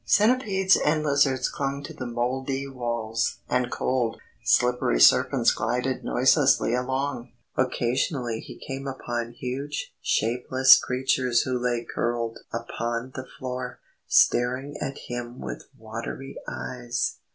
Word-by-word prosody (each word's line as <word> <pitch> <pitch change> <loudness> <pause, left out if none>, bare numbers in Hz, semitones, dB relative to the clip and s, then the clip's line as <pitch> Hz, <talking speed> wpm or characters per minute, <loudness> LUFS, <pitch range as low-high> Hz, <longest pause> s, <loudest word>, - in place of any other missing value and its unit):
Centipedes 205 -4 +3
and 155 +1 +1
lizards 140 -3 +2
clung 140 0 -3
to - - -7
the 130 - -6
mouldy 130 +3 -2
walls, 120 -3 -2
and 125 -1 +1
cold, 125 -3 -1 0.2
slippery 125 - +2
serpents - - +5
glided 125 +1 -1
noiselessly 130 -2 +3
along. 130 0 -2 0.2
Occasionally 125 -1 0
he - - -10
came 135 0 -6
upon 120 -3 -4
huge 135 +4 -5
shapeless 125 +3 +5
creatures 130 -1 +1
who 130 - -2
lay 120 -1 0
curled 120 -1 -2
upon 115 +1 -3
the 130 - -7
floor, 125 -1 -5 0.3
staring 130 +4 +3
at 135 - -3
him 120 0 -5
with - - -6
watery 115 +4 -7
eyes. 120 -1 -3
125 Hz, 120 wpm, -26 LUFS, 120-135 Hz, 0.3 s, serpents